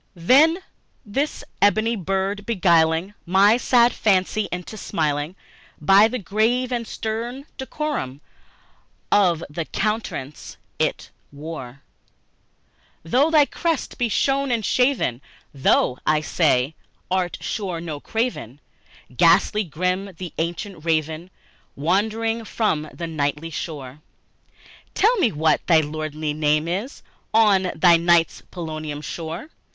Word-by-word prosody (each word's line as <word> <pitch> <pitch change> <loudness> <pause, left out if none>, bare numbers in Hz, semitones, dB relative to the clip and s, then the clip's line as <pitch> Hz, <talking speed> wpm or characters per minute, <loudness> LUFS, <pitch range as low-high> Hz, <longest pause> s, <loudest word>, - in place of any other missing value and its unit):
Then 275 - +5 0.5
this 275 +9 -2 0.2
ebony 215 +3 +3
bird 195 +1 -2
beguiling 170 -3 +2
my 195 +4 +5
sad 240 -1 +4
fancy 205 +1 +1
into 180 +4 -6
smiling, 155 -4 -2 0.4
By 195 +2 +6
the 250 - -3
grave 230 +5 0
and 235 -2 -2
stern 235 +5 -4
decorum 265 - -4 0.9
of 175 -5 +3
the 160 +3 -5
countenance 210 -11 -4 0.2
it - - -1 0.2
wore; 140 -3 -8 1.2
"Though 255 - +2
thy 305 -3 +5
crest 330 0 -3
be 240 -1 +1
shorn 275 +4 +1
and 230 -4 0
shaven, 250 - +1 0.3
thou," 130 -2 +2
I 155 0 +2
said, 150 -3 +1 0.4
"art 185 -2 0
sure, 185 -6 -3
no 160 -3 -5
craven; 220 - -3 0.6
Ghastly, 175 - +4
grim, 180 +4 -2
and 180 -2 -8
ancient 170 +1 -4
Raven, 160 +1 -1 0.5
wandering 220 +8 0
from 185 -9 -1
the 170 - -6
nightly 155 0 -2
shore, 145 -5 -6 1.0
Tell 445 +5 +4
me 260 - +2
what 155 0 +2
thy 165 -3 +5
lordly 155 0 -4
name 150 +1 +1
is 200 - -4 0.3
on 200 -4 +4
the 175 -2 +6
night's 170 0 +2
Plutonian 155 -4 -5
shore?" 165 - -6
180 Hz, 115 wpm, -22 LUFS, 155-225 Hz, 1.2 s, By